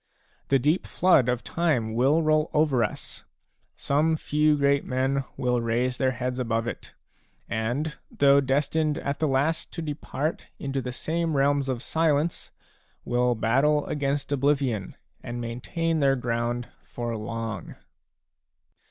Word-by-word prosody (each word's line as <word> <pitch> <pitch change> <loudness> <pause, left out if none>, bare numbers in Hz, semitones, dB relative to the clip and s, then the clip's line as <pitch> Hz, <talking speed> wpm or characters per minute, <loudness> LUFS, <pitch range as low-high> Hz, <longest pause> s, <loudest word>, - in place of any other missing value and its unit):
5 - - -38
The 135 - +5
deep 150 +8 +1
flood 160 -9 +4
of 125 -1 -1
time 140 -10 0
will 135 +8 +3
roll 155 0 +2
over 150 -6 +3
us; - - -5 0.5
some 155 +3 +1
few 150 0 +2
great 140 0 +2
men 135 +1 0
will 125 -1 +1
raise 120 +2 0
their 130 -1 +1
heads 125 +1 -3
above 115 -2 0
it, 120 - -6 0.5
and, 125 +8 -2
though 140 0 +4
destined 150 +3 +1
at 140 -3 -3
the 155 - +2
last 145 +4 0
to 170 - -4
depart 150 +1 -3
into 135 -1 -3
the 125 - -4
same 160 +3 -1
realms 140 0 +2
of 125 -1 -2
silence, 160 0 0 0.6
will 125 0 +2
battle 135 +7 +2
against 140 -1 -2
oblivion 135 -7 0 0.3
and 120 0 -5
maintain 155 +8 -2
their 135 -2 +4
ground 120 -1 -2
for 120 -1 -4
long. 110 -2 -5
135 Hz, 140 wpm, -26 LUFS, 120-150 Hz, 0.6 s, The